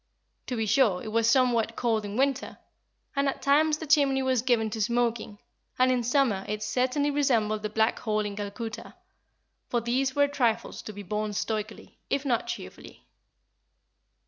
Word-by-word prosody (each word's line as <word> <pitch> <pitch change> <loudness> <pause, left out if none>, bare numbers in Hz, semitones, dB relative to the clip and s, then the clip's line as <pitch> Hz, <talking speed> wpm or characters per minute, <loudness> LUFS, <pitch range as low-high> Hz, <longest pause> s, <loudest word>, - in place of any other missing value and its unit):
To 250 - -2
be 225 -1 -1
sure, 215 -5 +2
it - - -5
was 230 +1 +2
somewhat 235 -3 +2
cold 225 -3 0
in 205 +2 -5
winter, 275 0 0 0.6
and 280 0 +2
at - - -4
times 300 +2 +3
the 320 - -7
chimney 280 -3 +3
was 260 -3 +1
given 230 -3 +1
to 220 0 -3
smoking, 235 -1 0 0.4
and 255 0 +4
in 250 -1 +1
summer 240 -5 +1
it 210 0 -3
certainly 255 +6 0
resembled 230 -7 +1
the 215 - -3
Black 220 +2 +1
Hole 215 -2 0
in 205 -1 -4
Calcutta; 210 +2 -6 0.7
but 235 -2 -1
these 260 +2 0
were 285 0 +4
trifles 250 -6 -1
to - - -8
be 205 0 -8
borne 210 +2 -3
stoically, 215 +1 -4
if 280 +1 -1
not 240 -4 0
cheerfully. - - -8
235 Hz, 170 wpm, -27 LUFS, 215-265 Hz, 0.7 s, and